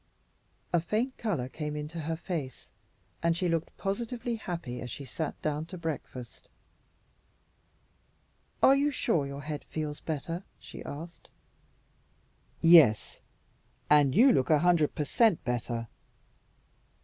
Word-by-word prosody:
A 175 - +5
faint 225 +9 -1
color 170 - -1
came 150 +2 -5
into 150 +3 -5
her 160 +1 -2
face, 160 -6 -5 0.5
and 170 0 +2
she 180 - 0
looked 165 -1 -2
positively 235 +4 -2
happy 170 - -5
as 125 - -6
she 140 +4 -6
sat 155 +3 -4
down 155 +1 -1
to 185 - -8
breakfast. 145 -7 -6 2.1
"Are 270 - +8
you 285 +1 +2
sure 165 - 0
your 140 +1 -7
head 150 0 -5
feels 150 -2 -4
better?" 165 +3 -4 0.2
she - - -10
asked. 165 +4 -9 1.3
"Yes, 165 -11 +6 0.7
and 145 -3 +5
you 255 +6 +7
look 130 - +1
a 155 - +6
hundred 170 -2 +3
per 150 - -1
cent 225 - +3
better. 120 -1 -2
160 Hz, 125 wpm, -29 LUFS, 145-180 Hz, 2.1 s, Are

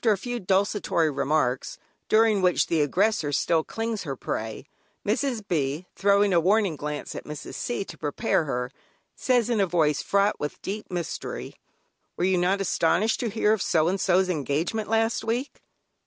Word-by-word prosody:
After 225 -3 +4
a - - -2
few 245 +5 -4
desultory 190 -4 +1
remarks, 140 -2 0 0.3
during 215 -2 +4
which 180 -1 +3
the 165 -2 +1
aggressor 175 +1 +1
still 160 +3 +2
clings 225 +1 -3
to - - -8
her 135 - -2
prey, 110 0 -4 0.4
Mrs. 225 -1 -1
B., 150 +1 -1
throwing 200 0 +3
a 170 - +5
warning 195 0 +2
glance 150 0 -5
at - - -7
Mrs. 150 -1 -7
C. 240 -5 -3
to - - -11
prepare 150 +1 0
her, 125 -2 -3 0.4
says 245 -3 +2
in 235 -3 +1
a 195 - +3
voice 155 -4 +2
fraught 200 +1 +1
with 150 - -4
deep 210 +2 -5
mystery: 175 -3 -5 0.6
"Were - - -1
you 185 -1 +3
not 190 +3 +1
astonished 195 +3 +1
to 235 - -1
hear 215 0 +2
of 220 - -1
so 160 -1 +2
and 190 0 -1
so's 185 +1 +3
engagement 165 +6 -1
last 225 0 +1
week?" 240 +5 -3
190 Hz, 175 wpm, -26 LUFS, 155-215 Hz, 0.6 s, a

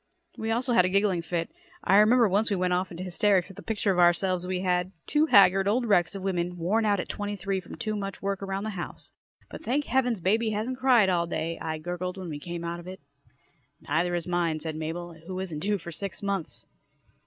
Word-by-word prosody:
We 220 - -4
also 240 +2 +1
had 180 - +6
a 185 - +1
giggling 195 -2 +2
fit. 165 0 -3 0.3
I 195 - +4
remember 225 +3 +6
once 205 +4 +1
we 205 - +1
went 180 -1 +1
off 180 +1 0
into 175 +1 -7
hysterics 190 +1 +2
at - - -14
the 200 - -9
picture 210 -2 0
of 180 - 0
ourselves 175 +1 +3
we 185 0 -2
had 180 0 0
two 305 +1 +2
haggard 195 -4 +6
old 240 +4 +2
wrecks 195 -4 +3
of 195 - -6
women, 180 -2 -1
worn 205 +7 +1
out 205 -2 +2
at - - -3
twenty 205 0 -4
three 195 0 -2
from 185 - -10
too 215 -1 -3
much 195 -1 -4
work 195 -1 -2
around 195 0 -3
the 215 - -3
house. 175 -4 -7 0.4
"But - - -9
thank 290 +2 0
Heavens 245 -4 +1
baby 220 +6 +1
hasn't 220 +5 -3
cried 245 -7 +5
all 170 -2 +1
day!" 165 0 -3
I 160 0 -3
gurgled 180 +3 -4
when 185 -2 -6
we 150 -2 -5
came 170 +2 -6
out 170 0 -4
of 175 - -11
it. 185 +1 -8 0.8
"Neither 175 +4 0
has 170 -2 -2
mine," 175 -3 0
said 160 0 -4
Mabel, 165 +2 -5
who 185 0 -4
isn't 175 -5 -4
due 205 +4 0
for 170 -1 -8
six 195 +4 -6
months. 195 -4 -3
190 Hz, 230 wpm, -27 LUFS, 175-205 Hz, 0.8 s, had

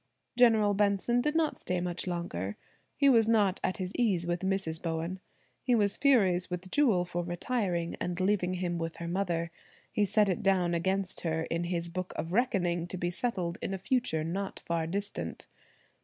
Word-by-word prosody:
General 225 -4 +5
Benson 205 +4 +2
did 300 +4 0
not 320 -2 +1
stay 180 0 -1
much 175 +1 -3
longer. 105 - -3 0.4
He 280 - +4
was 230 -5 +5
not 210 -4 +3
at 185 - 0
his 185 -2 -4
ease 195 -8 +1
with 175 0 -1
Mrs. 190 -4 -1
Bowen. 165 +2 -3 0.4
He 250 -2 +2
was 205 -3 +3
furious 195 -11 +3
with 180 +1 -5
Jewel 225 -12 +3
for 175 0 -3
retiring 175 -1 -1
and 175 0 -2
leaving 185 -1 +1
him 175 -1 -2
with 165 0 -3
her 170 - -6
mother. 170 -2 -1 0.4
He 210 - +2
set 210 +1 +3
it 195 +3 0
down 185 -3 +2
against 190 +2 0
her 160 -1 -1
in 170 +1 -2
his 170 -1 -1
book 185 +2 -5
of 165 +2 -4
reckoning 180 -7 +1
to 185 - -5
be 175 0 -1
settled 180 -4 -2
in 195 - -2
a - - -4
future 190 -6 0
not 190 +4 -3
far 165 -1 -1
distant. 200 +4 -4
185 Hz, 185 wpm, -30 LUFS, 170-205 Hz, 0.4 s, General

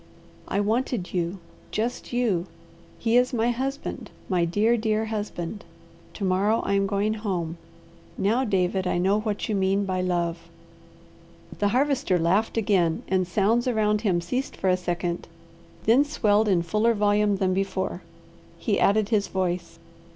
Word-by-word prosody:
"I 200 - -1
wanted 220 -1 -1
you! 175 +1 -1 0.3
Just 230 +3 -3
you! 220 -8 0 0.5
He 230 +1 +2
is 250 +1 +3
my 235 +1 +2
husband! 270 +3 -4 0.2
My 180 -3 +2
dear, 210 +7 +2
dear 220 -1 0
husband! 210 -3 -4 0.5
To 205 - -5
morrow 195 +4 +2
I - - 0
am 195 0 +2
going 205 +2 0
home! 180 -6 -3 0.6
Now, 225 +7 +2
David, 190 -4 0
I 180 - 0
know 195 +4 +2
what 215 -1 -2
you 220 - -1
mean 195 0 +1
by 185 -1 -1
love!" 170 -2 -2 1.1
The 205 - +2
Harvester 260 -3 +2
laughed 190 +8 +1
again 185 -7 +1
and 185 -1 +1
sounds 215 +7 +2
around 210 -3 +1
him 185 -6 +1
ceased 250 +10 -3
for 190 - 0
a - - +4
second, 175 -1 -3 0.6
then 240 +6 +5
swelled 215 -7 +2
in 180 -4 +2
fuller 215 +6 +2
volume 205 0 +2
than 190 -1 +1
before. 190 -1 -2 0.6
He 205 +4 0
added 210 0 +3
his 210 -3 +1
voice. 180 -2 -2
205 Hz, 150 wpm, -25 LUFS, 185-220 Hz, 1.1 s, then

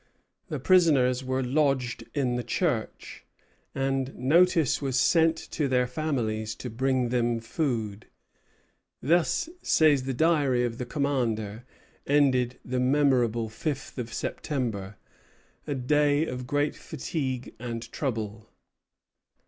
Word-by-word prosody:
The - - -4
prisoners 140 -9 +4
were 130 0 -1
lodged 130 -2 0
in 130 -4 +1
the 125 - -2
church, 120 - -2 0.5
and 135 -1 -1
notice 165 +4 +3
was 135 -2 -1
sent 165 -1 +4 0.2
to 150 -3 0
their 125 -1 +2
families 120 -6 -2
to 125 - -7
bring 130 +1 0
them 120 -1 +1
food. 115 -5 -3 1.0
"Thus," 170 - +2
says 145 -5 +3
the 135 - -2
Diary 145 -5 +2
of 115 -1 -4
the 125 - -4
commander, 120 -6 -1 0.4
"ended 130 -4 +2
the 125 0 -2
memorable 125 -4 +2
fifth 135 +5 -5
of 115 -2 -5
September, 110 -11 -3 0.7
a 145 - -1
day 145 +3 +2
of 125 -3 -5
great 145 +1 0
fatigue 130 -4 -4
and 115 -1 -5
trouble." 110 -5 -4
130 Hz, 115 wpm, -27 LUFS, 120-145 Hz, 1.0 s, prisoners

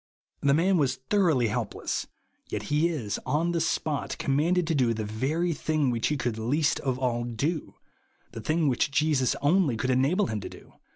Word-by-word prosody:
The 140 0 +3
man 185 +4 +3
was 140 -5 +1
thoroughly 145 - +1
helpless, 115 -1 -3 0.4
yet - - -3
he 155 +3 +3
is, 120 -12 -3
on 155 +6 0
the 170 -1 0
spot, 150 -3 -1
commanded 165 +6 +1
to 165 - 0
do 125 -6 +2
the 110 -1 -3
very 145 +11 -1
thing 150 -4 0
which 115 -2 0
he 150 - 0
could 120 -4 -2
least 140 +6 +1
of 130 -2 -1
all 120 -2 -1
do, 140 +7 -3 0.6
the 115 - -7
thing 155 +7 +1
which 130 0 +1
Jesus 140 -3 +2
only 150 -5 +3
could 130 +4 0
enable 140 +11 +2
him 110 -10 -3
to - - -6
do. - - -15
140 Hz, 185 wpm, -27 LUFS, 120-160 Hz, 0.6 s, The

